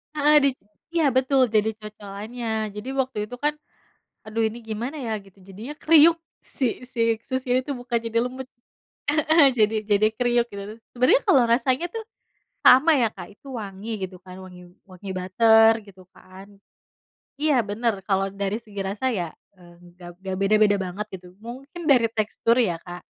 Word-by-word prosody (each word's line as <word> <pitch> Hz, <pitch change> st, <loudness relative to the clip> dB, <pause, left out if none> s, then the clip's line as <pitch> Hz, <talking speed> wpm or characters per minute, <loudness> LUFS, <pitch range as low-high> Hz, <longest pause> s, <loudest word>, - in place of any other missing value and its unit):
Heeh. 300 Hz, 0 st, +4 dB
Di 280 Hz, -, +5 dB, 0.4 s
iya, 330 Hz, -4 st, +2 dB
betul. 260 Hz, 0 st, +3 dB
Jadi 220 Hz, -1 st, +1 dB
cocolannya. 215 Hz, +2 st, -5 dB
Jadi 210 Hz, +5 st, -6 dB
waktu 265 Hz, -3 st, -2 dB
itu 245 Hz, -, -8 dB
kan, 295 Hz, +1 st, 0 dB, 0.7 s
aduh, 225 Hz, +1 st, -1 dB
ini 220 Hz, +2 st, -2 dB
gimana 230 Hz, +6 st, -5 dB
ya, 225 Hz, -4 st, -2 dB
gitu. 195 Hz, 0 st, -21 dB
Jadinya 195 Hz, +8 st, -9 dB
kriuk, 325 Hz, +1 st, +6 dB, 0.2 s
si 255 Hz, -1 st, -3 dB
si 230 Hz, -2 st, 0 dB
susnya 260 Hz, -1 st, -2 dB
itu 285 Hz, -, -4 dB
bukan 245 Hz, -2 st, -3 dB
jadi 230 Hz, 0 st, -1 dB
lembut, 255 Hz, +2 st, -5 dB, 0.7 s
heeh. 310 Hz, -1 st, +5 dB
Jadi 215 Hz, -1 st, +3 dB
jadi 205 Hz, 0 st, +4 dB
kriuk, 240 Hz, +1 st, +1 dB
gitu. 200 Hz, +2 st, -7 dB, 0.2 s
Sebenernya 255 Hz, +2 st, +4 dB
kalo 270 Hz, -, +5 dB
rasanya 255 Hz, +6 st, +1 dB
tuh, 450 Hz, +4 st, -7 dB, 0.6 s
sama 295 Hz, +4 st, +7 dB
ya, 235 Hz, -3 st, +3 dB
Kak. -, -, -10 dB
Itu 275 Hz, -2 st, -11 dB
wangi, 205 Hz, -1 st, -7 dB
gitu 185 Hz, -1 st, -9 dB
kan. 185 Hz, +1 st, -12 dB
Wangi 180 Hz, -1 st, -13 dB, 0.2 s
wangi 185 Hz, +1 st, -9 dB
butter, 220 Hz, +5 st, +5 dB
gitu 190 Hz, -2 st, -15 dB
kan. 195 Hz, +1 st, -16 dB, 0.8 s
Iya, 290 Hz, -3 st, +2 dB
bener. 225 Hz, +2 st, -1 dB
Kalo 195 Hz, 0 st, -1 dB
dari 200 Hz, +1 st, -2 dB
segi 210 Hz, -4 st, -8 dB
rasa 205 Hz, +7 st, -2 dB
ya, 175 Hz, -6 st, -2 dB, 0.2 s
eee, 175 Hz, -2 st, -18 dB, 0.2 s
gak 175 Hz, -1 st, -11 dB
gak 190 Hz, 0 st, -2 dB
beda-beda 210 Hz, +1 st, +4 dB
banget, 190 Hz, +3 st, -4 dB
gitu. 180 Hz, 0 st, -11 dB
Mungkin 265 Hz, +10 st, -9 dB
dari 250 Hz, -6 st, +4 dB
tekstur, 225 Hz, +1 st, 0 dB
ya, 180 Hz, -9 st, +1 dB
Kak. 175 Hz, 0 st, -10 dB
225 Hz, 165 wpm, -24 LUFS, 195-255 Hz, 0.8 s, sama